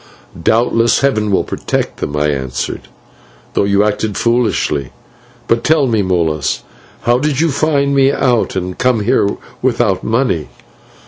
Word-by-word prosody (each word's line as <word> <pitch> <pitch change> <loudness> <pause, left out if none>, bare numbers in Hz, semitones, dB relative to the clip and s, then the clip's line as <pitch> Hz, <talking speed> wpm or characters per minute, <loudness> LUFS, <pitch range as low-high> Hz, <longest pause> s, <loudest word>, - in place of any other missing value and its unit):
"Doubtless 115 +2 +2
Heaven 110 -7 +1
will 95 - +2
protect - - -3
them," 75 - -4
I 75 +1 +1
answered, 65 -3 -3 0.7
"though - - +1
you 100 0 +3
acted 105 0 -1
foolishly. 115 - 0 0.6
But 115 0 +1
tell 155 -2 +3
me, 115 -4 +1
Molas, 85 -6 0 0.4
how 120 +1 +2
did 145 -1 -1
you 165 -1 +2
find 140 -1 +1
me 135 0 +4
out 125 -7 +1
and 90 -1 -4
come 125 -3 +2
here 105 -1 +2 0.3
without 120 -6 +1
money?" 110 - 0
115 Hz, 140 wpm, -15 LUFS, 95-130 Hz, 0.7 s, me